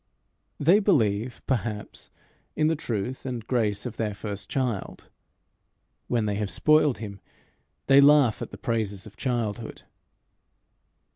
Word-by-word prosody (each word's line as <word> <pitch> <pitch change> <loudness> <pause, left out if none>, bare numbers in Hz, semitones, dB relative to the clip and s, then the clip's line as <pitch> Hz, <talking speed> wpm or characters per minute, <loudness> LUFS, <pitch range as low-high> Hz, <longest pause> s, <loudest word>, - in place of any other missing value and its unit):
They 175 +8 +5
believe, 120 - +1
perhaps, 110 -5 -3 0.5
in 155 - +1
the 160 - +1
truth 120 -3 -4
and 125 -4 -5
grace 105 -5 0
of 125 - -6
their 105 -3 -2
first 100 -1 -6
child: 125 -7 -3 1.0
when 115 -3 0
they 105 - 0
have 105 -2 -2
spoiled 150 0 +3
him, 100 -3 -7 0.7
they 135 +1 +7
laugh 140 -5 +5
at - - -4
the - - -10
praises 110 -6 -2
of 105 - -13
childhood. 115 -3 -3
115 Hz, 130 wpm, -26 LUFS, 105-135 Hz, 1.0 s, they